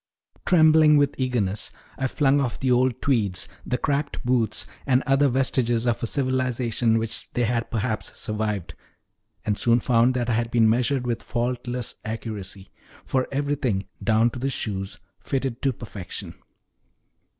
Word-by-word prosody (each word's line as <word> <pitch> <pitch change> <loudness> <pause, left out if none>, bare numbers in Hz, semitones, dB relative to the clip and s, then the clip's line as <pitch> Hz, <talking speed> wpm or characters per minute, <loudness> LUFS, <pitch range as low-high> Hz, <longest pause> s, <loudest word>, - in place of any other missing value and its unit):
Trembling 155 -3 +6
with 145 0 +3
eagerness, 115 -6 0 0.2
I 130 - -1
flung 140 +1 +2
off 120 -7 -2
the 130 -1 +1
old 125 0 +2
tweeds, 105 -9 +1 0.2
the 125 - -1
cracked 145 -1 -2
boots, 120 -4 +1 0.2
and 130 0 +3
other 135 0 +4
vestiges 125 -2 +1
of 120 -2 0
a 115 - -1
civilization 125 -3 +1
which 115 0 -3
they 120 - +1
had 115 0 0
perhaps 110 -1 -3
survived, 105 -4 -3 0.7
and 105 -1 0
soon 120 0 +4
found 120 +1 +3
that 120 -1 0
I 120 - +1
had 115 +1 0
been 115 -2 +4
measured 125 +3 +1
with 120 -2 -1
faultless 120 0 -2
accuracy; 105 -3 -6 0.3
for 130 -1 0
everything, 135 -8 0 0.2
down 115 +1 +3
to 125 - -7
the 135 +2 -1
shoes, 95 -6 -3 0.3
fitted 135 -3 -2
to 135 - +2
perfection. 105 -6 -7
120 Hz, 150 wpm, -24 LUFS, 110-130 Hz, 0.7 s, Trembling